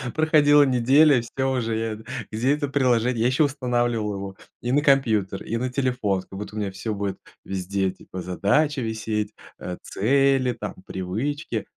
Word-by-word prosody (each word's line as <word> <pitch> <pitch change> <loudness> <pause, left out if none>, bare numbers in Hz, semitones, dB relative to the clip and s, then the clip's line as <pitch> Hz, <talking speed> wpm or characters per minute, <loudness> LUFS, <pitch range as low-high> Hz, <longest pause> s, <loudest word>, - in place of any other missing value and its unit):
Проходила 150 -2 +5
неделя, 135 +1 +4
всё 130 +3 -2
уже, 115 -4 -1
я 110 -1 -2
эт 110 +1 -11 0.2
Где 125 +6 +1
это 150 -1 -2
приложение? 125 -4 +2
Я - - +4
еще 130 +5 +3
устанавливал 120 -6 0
его 95 0 -7 0.2
и 125 - -2
на 145 +2 +3
компьютер, 110 -9 +2
и 115 - -2
на 125 +2 -2
телефон. 125 -8 0
Как 95 - -11
будто 105 +1 -7
у 110 - -3
меня 100 -2 -2
всё 105 +3 -4
будет 100 -1 -3 0.3
везде, 95 0 -1
типа, 90 0 -9
задачи 130 - +1
висеть, 110 -2 -2 0.3
а, 90 - -5
цели, 135 +2 +2
там, 105 -3 -6
привычки. 110 +6 -3
115 Hz, 170 wpm, -24 LUFS, 105-135 Hz, 0.3 s, Проходила